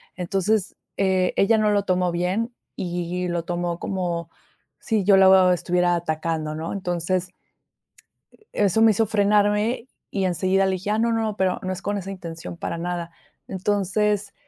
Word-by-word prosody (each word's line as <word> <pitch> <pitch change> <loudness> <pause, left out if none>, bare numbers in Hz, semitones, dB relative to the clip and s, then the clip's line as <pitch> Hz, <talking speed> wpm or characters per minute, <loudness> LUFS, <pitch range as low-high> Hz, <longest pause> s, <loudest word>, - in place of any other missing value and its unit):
Entonces, 195 +3 -1 0.2
eh, 190 -2 +2
ella 220 +3 +4
no 210 -1 +2
lo 205 -1 +2
tomó 180 -2 +1
bien 195 +8 -1 0.2
y 180 0 -3
lo 170 -1 -2
tomó 175 0 -2
como 175 -3 -3 0.5
sí 220 -5 0
yo 195 0 +5
la, 190 0 +7
oh, 185 -1 +6
estuviera 180 0 +1
atacando, 155 -2 -2
¿no? 160 +1 -4
Entonces 180 -1 -2 1.2
e 210 - +1
eso 210 +4 +2
me 225 -1 +7
hizo 220 +2 +2
frenarme 210 +3 +2 0.2
y 195 -2 -1
enseguida 185 +2 +1
le 190 - +1
dije: 185 +3 -4
"Ah, 215 - +1
no, 230 0 +2
no, 220 -2 -1
pero 185 -1 +1
no 185 - -2
es 190 - -7
con 205 0 -2
esa 195 0 -5
intención 170 -2 -8
para 170 - -4
nada." 170 0 -4 0.4
Entonces, 205 +1 0
185 Hz, 165 wpm, -23 LUFS, 175-205 Hz, 1.2 s, la